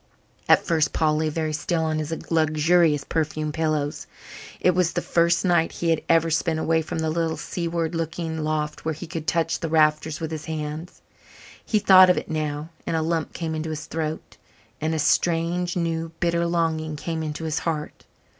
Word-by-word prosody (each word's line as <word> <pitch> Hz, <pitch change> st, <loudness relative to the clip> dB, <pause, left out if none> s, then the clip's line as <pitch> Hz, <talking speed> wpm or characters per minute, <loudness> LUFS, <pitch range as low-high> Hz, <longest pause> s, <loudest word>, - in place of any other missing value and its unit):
At -, -, +5 dB
first 160 Hz, -3 st, +1 dB
Paul 155 Hz, -1 st, +2 dB
lay 155 Hz, 0 st, 0 dB
very 155 Hz, 0 st, -2 dB
still 160 Hz, +2 st, -1 dB
on 155 Hz, -1 st, 0 dB
his 155 Hz, +1 st, -4 dB, 0.2 s
luxurious 155 Hz, -1 st, +3 dB
perfumed 155 Hz, -1 st, -2 dB
pillows. 155 Hz, -2 st, -1 dB, 0.5 s
It 180 Hz, -, +4 dB
was 180 Hz, -1 st, +1 dB
the 175 Hz, -, -1 dB
first 170 Hz, +2 st, +2 dB
night 170 Hz, -2 st, +2 dB
he 170 Hz, -1 st, 0 dB
had 160 Hz, -, +1 dB
ever 165 Hz, 0 st, +4 dB
spent 160 Hz, 0 st, +1 dB
away 160 Hz, 0 st, +1 dB
from 160 Hz, -, -5 dB
the 160 Hz, -1 st, 0 dB
little 165 Hz, 0 st, -1 dB
seaward 170 Hz, -1 st, -3 dB
looking 165 Hz, 0 st, -3 dB
loft 155 Hz, -1 st, -2 dB
where 160 Hz, -1 st, -2 dB
he 175 Hz, -, -7 dB
could 160 Hz, -1 st, -6 dB
touch 165 Hz, -1 st, +1 dB
the 165 Hz, -, -3 dB
rafters 155 Hz, 0 st, +2 dB
with 160 Hz, -1 st, -4 dB
his 155 Hz, -2 st, -5 dB
hands. 155 Hz, +1 st, -6 dB, 0.6 s
He 215 Hz, -, +1 dB
thought 185 Hz, -2 st, +7 dB
of 180 Hz, -, +4 dB
it -, -, -4 dB
now 155 Hz, 0 st, -3 dB, 0.2 s
and -, -, 0 dB
a -, -, +1 dB
lump 165 Hz, 0 st, -1 dB
came 165 Hz, -2 st, -3 dB
into 160 Hz, 0 st, -3 dB
his 155 Hz, -1 st, -5 dB
throat 160 Hz, -1 st, -5 dB, 0.4 s
and 160 Hz, +1 st, 0 dB
a -, -, -1 dB
strange, 170 Hz, +3 st, +1 dB
new, 165 Hz, -2 st, -2 dB
bitter 170 Hz, 0 st, +1 dB
longing 160 Hz, -2 st, -1 dB
came 160 Hz, +2 st, -4 dB
into 155 Hz, 0 st, -4 dB
his 160 Hz, -1 st, -1 dB
heart. 155 Hz, -3 st, -4 dB
160 Hz, 190 wpm, -24 LUFS, 155-170 Hz, 0.6 s, thought